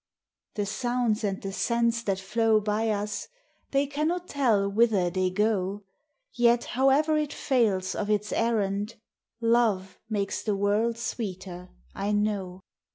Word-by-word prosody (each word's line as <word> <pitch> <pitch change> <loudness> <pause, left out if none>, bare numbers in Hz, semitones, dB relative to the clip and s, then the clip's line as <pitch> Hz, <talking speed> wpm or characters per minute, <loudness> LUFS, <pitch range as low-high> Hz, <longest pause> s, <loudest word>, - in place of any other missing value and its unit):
The 205 -2 -1
sounds 240 +1 -1
and 195 -2 -1
the 195 - -3
scents 235 +1 +1
that 195 -4 -1
flow 215 +2 +2
by 215 +2 0
us 210 0 -2 0.2
— - - -41
They 275 +1 +2
cannot 310 +5 -2
tell 230 -8 +2
whither 200 -4 +2
they 185 0 +1
go; 205 0 0 0.5
Yet, 240 0 +3
however 275 +4 +3
it 300 -1 -2
fails 210 -8 +1
of 210 - -3
its 210 0 0
errand, 210 -2 0 0.5
Love 230 -5 +1
makes 200 -2 -1
the 210 -2 -1
world 210 +4 +1
sweeter, 185 -6 -5 0.2
I 200 +1 -2
know. 200 -3 -1
215 Hz, 140 wpm, -27 LUFS, 200-235 Hz, 0.5 s, Yet